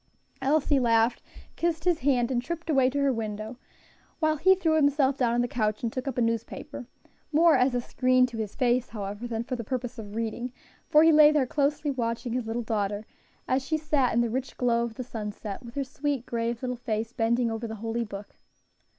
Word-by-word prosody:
Elsie 285 +1 +2
laughed, 230 -1 +2 0.3
kissed 330 -2 -1
his 345 -2 +2
hand, 255 -2 +2
and 240 -2 +1
tripped 335 +4 -4
away 265 -3 +4
to 275 - -4
her 280 -1 +2
window, 220 +1 -5 0.6
while 310 -1 +1
he 375 +5 +5
threw 340 -4 +1
himself 285 -2 +3
down 240 -3 +1
on 240 - +2
the 245 - 0
couch 215 -3 -1
and 230 - -1
took 255 +1 -4
up 265 - -3
a - - +2
newspaper, 230 +4 -3 0.4
more 325 +2 +5
as 250 0 +3
a 245 - +1
screen 255 +1 +3
to 240 -2 -6
his 215 -1 -4
face, 250 -1 +1
however, 205 +1 -5
than 225 -1 -3
for 255 +1 -4
the 235 - -5
purpose 250 +1 -4
of 205 -1 -8
reading; 230 +2 -3 0.4
for 305 -1 +6
he 325 - +7
lay 305 -1 +8
there 295 -3 +2
closely 290 +2 0
watching 235 -1 -2
his 245 -2 -2
little 235 +2 -2
daughter, 210 -1 -2 0.4
as 260 +1 +1
she 315 +3 0
sat 295 -5 +1
in 235 - +2
the 235 - 0
rich 260 +2 -4
glow 235 -2 +2
of 235 -1 -5
the 255 - -4
sunset, 210 -3 -6
with 235 0 -11
her 280 - 0
sweet, 275 -1 -3
grave 235 +1 -2
little 250 -1 -2
face 225 -1 -3
bending 235 +1 +1
over 225 +1 -4
the 220 - -6
holy 225 +2 -2
book. 200 -2 -9
245 Hz, 215 wpm, -27 LUFS, 230-280 Hz, 0.6 s, lay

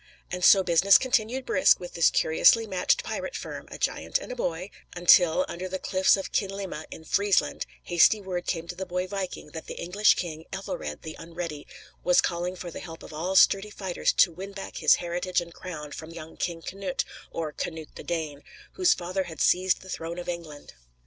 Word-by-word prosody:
And 180 0 -4
so 195 +1 +7
business 185 +3 +6
continued 255 0 0
brisk 280 - +4
with 175 - -8
this 170 - +4
curiously 225 +8 +4
matched 205 - +1
pirate - - -4
firm - - -7
a - - -8
giant - - -1
and - - -8
a - - -4
boy 180 -4 -3 0.2
until, 175 +7 +5
under 185 -3 -5
the 190 - -2
cliffs 190 +1 +3
of 195 - -5
Kinlimma, 195 -5 -3
in 160 - -10
Friesland, 195 - +1 0.2
hasty 175 +5 +4
word 185 -3 -5
came 170 -2 -2
to - - -5
the 190 0 -6
boy 180 +1 -2
viking 190 -5 -5
that 160 - -8
the - - -6
English 200 +5 +3
king, 160 -2 -5
Ethelred 195 0 -5
the 160 -1 -7
Unready, 165 -3 -6 0.4
was 180 0 +4
calling 175 +1 0
for 175 -1 -7
the - - -7
help 165 -2 -10
of - - -11
all 175 +5 -2
sturdy 195 +2 +5
fighters 190 -4 -1
to 175 - +5
win 190 +4 -8
back 195 -1 -7
his - - +5
heritage 175 +1 -1
and 170 -1 -8
crown 150 -5 -8
from 160 +2 -8
young 165 -1 -10
King 170 -2 -3
Cnut, 260 +9 -3 0.3
or 160 -2 -4
Canute 160 0 -6
the - - -8
Dane, 155 -4 -3 0.3
whose 365 -1 +3
father 185 +2 -3
had 160 -4 -9
seized 185 +1 +2
the 190 - -13
throne 165 +1 -5
of 175 - -6
England. 165 -4 -7
180 Hz, 200 wpm, -27 LUFS, 165-195 Hz, 0.4 s, so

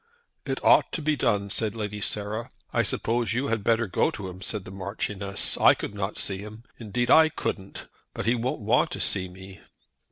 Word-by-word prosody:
"It - - -3
ought - - +5
to 165 - -1
be 155 0 +2
done," 105 -7 0
said 110 0 0
Lady 105 -1 -4
Sarah. 105 +3 -2 0.2
"I - - +3
suppose 115 -2 0
you 130 +4 -1
had 115 -3 -1
better 115 +1 +2
go 100 - +1
to 105 -12 -6
him," 90 +1 -10
said 105 -1 -3
the - - -9
Marchioness. 100 0 -1
"I - - +7
could - - -6
not 100 0 -3
see 95 -2 0
him; 105 +2 -10 0.2
indeed 120 +2 -1
I 160 0 +7
couldn't. 95 -9 -5 0.3
But - - -4
he 115 - +3
won't 125 +2 -2
want 120 +9 +2
to - - -5
see 95 -2 +1
me." 95 +1 -12
105 Hz, 200 wpm, -26 LUFS, 100-115 Hz, 0.3 s, I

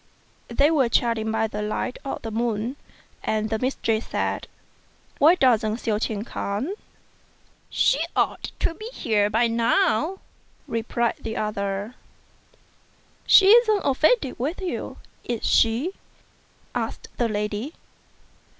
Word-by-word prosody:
They 280 +6 +3
were 270 -7 +3
chatting 230 -2 +1
by 220 0 +1
the 210 -1 -4
light 215 +4 -3
of 275 - -5
the 225 - -5
moon; 230 +2 -1 0.5
and 215 0 -1
the 220 - 0
mistress 230 -3 -1
said, - - -2 0.7
"Why 320 +5 +7
doesn't 230 - +3
Hsiao 215 -3 -1
ch'ien 215 -1 -2
come?" 230 - -3 1.0
"She - - +2 0.2
ought - - 0
to - - +1
be 430 +6 -8
here 215 - +1
by 225 +3 +2
now," 230 - +2 0.5
replied 230 +1 -1
the 220 0 -4
other. 200 +1 -3 0.7
" - - -35
She 385 - +8
isn't 435 -2 +6
offended 280 - +2
with 295 +9 -2
you; 370 -3 -4 0.3
is 235 -2 -3
she?" 235 +10 +3 0.8
asked - - -4
the 240 -2 +1
lady. 210 +6 -3
230 Hz, 125 wpm, -24 LUFS, 215-275 Hz, 1.0 s, She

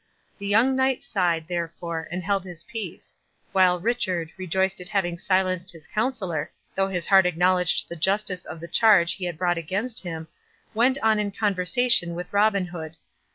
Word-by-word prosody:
The 200 - -5
young 230 +6 +4
knight 265 -1 +1
sighed, 170 -4 0
therefore, 170 -1 -4
and 180 +1 -4
held 200 -1 0
his 175 -3 -9
peace; 215 -7 -7 0.4
while 185 -2 +4
Richard, 180 -6 -1
rejoiced 190 +1 -1
at 180 - -8
having 175 -5 -1
silenced 185 -1 0
his 160 -2 -12
counsellor, 190 - -2 0.2
though 195 0 +1
his 180 -3 -2
heart 190 -2 +5
acknowledged 180 +1 +2
the 170 - -7
justice 190 +1 0
of 160 - -8
the 170 - -7
charge 195 -4 +4
he 185 - -5
had 175 -3 -4
brought 175 0 0
against 200 +9 -1
him, 165 -3 -6 0.5
went 245 +4 +3
on 220 -1 +3
in 210 -1 -1
conversation 195 -1 +1
with 180 +2 -7
Robin 200 -2 +3
Hood. 165 -3 -8
185 Hz, 170 wpm, -24 LUFS, 170-205 Hz, 0.5 s, heart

